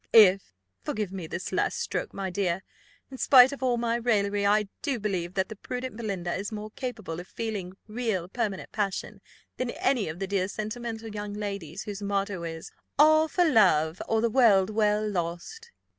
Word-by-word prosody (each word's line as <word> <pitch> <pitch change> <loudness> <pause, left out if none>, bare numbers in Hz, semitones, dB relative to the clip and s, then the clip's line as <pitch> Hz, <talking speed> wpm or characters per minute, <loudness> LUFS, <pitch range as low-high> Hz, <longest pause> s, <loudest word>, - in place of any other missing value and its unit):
If! 195 - +7 0.3
forgive 210 - -3
me 185 -4 -5
this 175 +3 -5
last - - 0
stroke, 470 - -2
my 195 -1 -4
dear 185 -1 -1 0.5
in 260 - -9
spite 260 -1 +8
of 280 - -7
all 250 -2 +2
my 235 0 0
raillery, 205 -4 +1
I 210 0 +3
do 275 -6 -1
believe 185 -4 -2
that 190 -1 +1
the 220 - -8
prudent 250 +3 -5
Belinda 195 -6 -3
is 200 +3 -3
more 215 0 -6
capable 215 -10 -5
of 180 - -9
feeling 205 -5 -4
real 215 -6 -2
permanent 205 -1 -3
passion 200 -3 -3 0.4
than 255 -1 -2
any 275 - 0
of 160 - -6
the 195 - -2
dear 190 -1 0
sentimental 225 +2 -5
young 205 -1 -5
ladies, 200 -6 -5
whose 205 -1 -6
motto 200 -2 -1
is 165 -1 -6 0.3
'All 310 +1 +6
for 355 +2 +2
love, 180 - +4
or 225 -1 +2
the 235 0 +1
world 215 -6 +5
well 210 0 +2
lost. 185 - -4
210 Hz, 180 wpm, -27 LUFS, 190-235 Hz, 0.5 s, spite